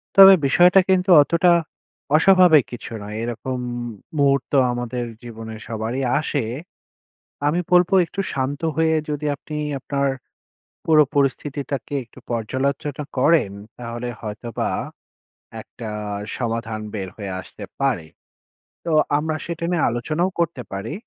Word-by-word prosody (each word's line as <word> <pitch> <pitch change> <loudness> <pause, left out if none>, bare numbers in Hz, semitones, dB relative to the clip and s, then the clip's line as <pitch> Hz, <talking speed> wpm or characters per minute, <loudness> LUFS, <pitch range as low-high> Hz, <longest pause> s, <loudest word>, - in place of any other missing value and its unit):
তবে 195 0 +11
বিষয়টা 175 +7 +6
কিন্তু 185 0 +2
অতটা 170 +4 +3 0.6
অস্বাভাবিক 175 -4 +6
কিছু 120 -1 -8
নয়। 105 +1 -7
এরকম 125 +2 -4 0.6
মুহূর্ত 140 -1 +2 0.2
আমাদের 120 0 -3 0.2
জীবনে 110 -1 -8
সবারই 115 +4 -3 0.2
আসে। 145 -4 -1 1.0
আমি 165 +4 +1
বলবো 180 +2 +4
একটু 195 - -9
শান্ত 135 +1 -2
হয়ে 160 0 +2
যদি 150 0 -3
আপনি 150 +2 -9 0.2
আপনার 140 +1 -1 0.8
পুরো 155 -2 +6
পরিস্থিতিটাকে 140 -1 -1
একটু 120 +2 -17
পর্যালোচনা 135 +5 -2
করেন, 150 -7 +3 0.3
তাহলে 120 0 -5
হয়তোবা 110 +1 -4 0.9
একটা 115 -2 -9 0.5
সমাধান 115 -2 -3
বের 95 -3 -4
হয়ে 100 -3 -5
আসতে - - -11 0.2
পারে। 125 -13 0 0.8
তো 165 - -1 0.3
আমরা 155 +1 -1
সেটা 170 -1 -5
নিয়ে 170 -4 +2
আলোচনাও 155 +10 -1
করতে 170 -6 0
পারি। 100 +8 -4
140 Hz, 115 wpm, -22 LUFS, 115-160 Hz, 1.0 s, তবে